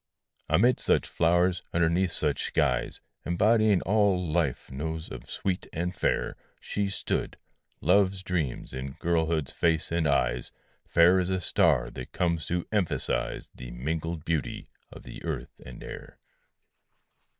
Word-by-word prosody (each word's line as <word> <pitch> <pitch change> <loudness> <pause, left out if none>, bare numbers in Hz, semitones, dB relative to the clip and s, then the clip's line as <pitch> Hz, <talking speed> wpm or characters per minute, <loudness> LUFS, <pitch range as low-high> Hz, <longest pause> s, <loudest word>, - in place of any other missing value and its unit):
Amid 120 +4 +4
such - - +2
flowers, 85 +1 +2
underneath 85 +2 +2
such 75 -3 +1
skies, - - 0 0.2
Embodying 105 +2 +3
all 100 -3 +2
life 80 -8 -1
knows 80 +4 -4
of - - -9
sweet 95 -2 -2
and 90 +2 -2
fair, - - 0 0.2
She 100 -1 -2
stood; 95 - -2 0.4
love's 95 -1 +3
dreams 85 -12 -2
in 65 +1 -5
girlhood's 80 -3 0
face 80 -1 +1
and 85 -2 +1
eyes, 70 -3 +1 0.4
Fair 85 +3 +5
as 90 0 0
a 95 0 0
star 65 -7 +3
that 60 - -8
comes 85 -3 0
to 90 0 -1
emphasize 105 -6 -1
The - - -9
mingled 80 +6 -3
beauty 80 -6 -2 0.2
of - - -11
the - - -10
earth - - -5
and 65 -2 -10
air. - - -9
85 Hz, 135 wpm, -28 LUFS, 80-95 Hz, 0.4 s, Fair